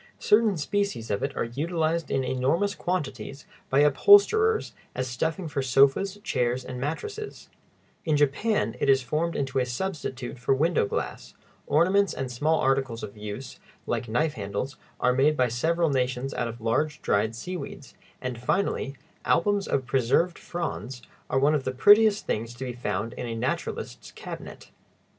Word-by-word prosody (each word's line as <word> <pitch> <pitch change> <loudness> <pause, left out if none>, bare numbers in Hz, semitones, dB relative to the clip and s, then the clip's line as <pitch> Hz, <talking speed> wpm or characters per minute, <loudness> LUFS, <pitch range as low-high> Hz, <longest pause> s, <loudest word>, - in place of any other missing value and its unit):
Certain 210 -3 +3
species 200 - -2
of 100 - -1
it 140 - -3
are - - +1
utilized 160 +6 -1
in 135 - 0
enormous 135 +11 +1
quantities 150 - -4 0.2
by 135 +2 +4
upholsterers 410 - +5 0.2
as 130 0 -2
stuffing 160 +9 -2
for 145 -2 -2
sofas, 135 +10 +3
chairs, 125 -1 0
and 125 -1 -6
mattresses; 420 - -5 0.5
in 155 -3 +1
Japan 145 - +1
it - - +1
is 135 -1 +4
formed 155 +6 -1
into 135 -1 -1
a - - +2
substitute 130 -4 -4
for 130 +2 +2
window 155 - +2
glass; - - -4 0.3
ornaments 190 +6 +3
and 130 -1 -4
small 150 +6 +1
articles 135 -3 0
of 100 - -7
use, 105 +5 -7 0.3
like 120 - -2
knife 150 +7 +1
handles, 100 +5 -4 0.2
are 125 - +3
made 145 +4 +3
by 125 - +3
several 160 +7 +1
nations 130 0 -1
out 120 - -1
of 115 0 -7
large 145 +7 0
dried 110 +3 +1
seaweeds; 175 0 -7 0.3
and, 125 -2 -3
finally, 140 -1 0 0.3
albums 205 +2 +2
of 135 -2 0
preserved 135 +8 +1
fronds 125 - -5 0.3
are - - +1
one 140 +3 +4
of 145 -3 0
the 130 - -1
prettiest 205 - +5
things 115 +2 -3
to 130 +2 -6
be 125 - -4
found 110 -1 -3
in 125 - -5
a 115 - -4
naturalist's 120 +3 -4
cabinet. - - -9
135 Hz, 160 wpm, -26 LUFS, 125-170 Hz, 0.5 s, upholsterers